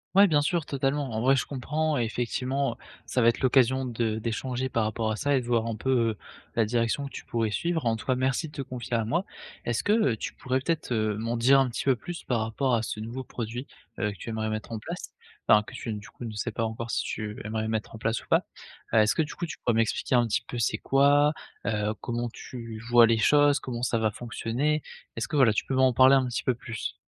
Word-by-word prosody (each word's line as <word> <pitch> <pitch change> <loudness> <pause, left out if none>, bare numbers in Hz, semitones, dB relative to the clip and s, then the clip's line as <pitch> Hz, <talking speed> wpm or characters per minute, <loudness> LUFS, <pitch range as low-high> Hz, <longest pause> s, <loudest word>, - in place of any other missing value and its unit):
Ouais, 200 +1 +8
bien 150 -4 +3
sûr, 170 +2 +1
totalement. 140 0 -1
En 110 0 -2
vrai, 135 +2 +4
je 135 - -1
comprends, 150 +3 -1
effectivement. 125 +3 -1
Heu, - - -16 0.3
ça 125 +1 +1
va 115 - +7
être 115 - -1
l'occasion 130 0 +3
de 115 -2 -1
d'échanger 125 +3 -2
par 115 -3 +1
rapport 110 +1 -1
à - - -1
ça 140 +5 +1
et 130 - +2
de - - -9
voir 115 -2 +2
un 115 -1 -2
peu, 120 +5 -4 0.2
heu, 105 - -8 0.4
la 115 - +3
direction 115 +5 0
que - - -9
tu - - -8
pourrais 115 -2 0
suivre. 165 +3 -1
En 115 - +2
tout 145 - -8
cas, 130 - +2
merci 130 +5 0
de - - -13
te 145 - -5
confier 125 -2 -6
à 115 -2 +1
moi. 170 - 0 0.4
Est-ce 120 -1 0
que, 205 - +1 0.2
heu, - - -1
tu - - -5
pourrais 130 0 -1
peut-être, 155 -2 -2
heu, 110 -2 0
m'en 115 +2 -2
dire 130 +4 +5
un 135 - +3
petit 120 - -4
peu 135 - +4
plus 175 +8 -7
par 120 -3 0
rapport 120 +3 0
à 115 - 0
ce 105 - -4
nouveau 120 +4 -5
produit, 120 +1 -5 0.3
heu, 105 -2 0
que 100 - -11
tu - - -7
aimerais 110 -1 -2
mettre 110 +1 -5
en 115 - -3
place. - - -7 0.3
Enfin 105 0 +6
que - - -12
tu - - -6
n 110 - -2
du 105 - -10
coup, 120 - -9
ne 115 - -4
sais 105 +3 -2
pas 115 +1 -2
encore 115 +1 -3
si - - 0
tu 105 -1 -5
aimerais 110 +1 -2
mettre 110 0 -3
en - - -7
place 115 +1 -1
ou - - -21
pas? - - +4 0.5
Est-ce 110 -1 +4
que, 160 - +3
du 150 - -7
coup, 175 - -4
tu - - -7
pourrais 120 - 0
m'expliquer 115 +3 0
un 120 -1 +4
petit 105 - 0
peu, 120 - -5
c'est 110 -1 +1
quoi? 145 +3 +4 0.3
Heu, 105 0 0
comment 120 0 -2
tu 115 -2 -8
vois 120 -1 +7
les 115 0 +3
choses? 145 +5 +4
Comment 120 -2 -5
ça 120 -1 +1
va 110 -1 +1
fonctionner? 120 +7 -1 0.3
Est-ce 115 - -3
que, 160 - -4
voilà, 125 -6 +6
tu - - -1
peux - - -3
m'en 130 -1 +4
parler 130 +3 +6
un 130 -2 +2
petit 120 - -3
peu 130 - +2
plus? 115 -1 -5
120 Hz, 260 wpm, -27 LUFS, 110-135 Hz, 0.5 s, Ouais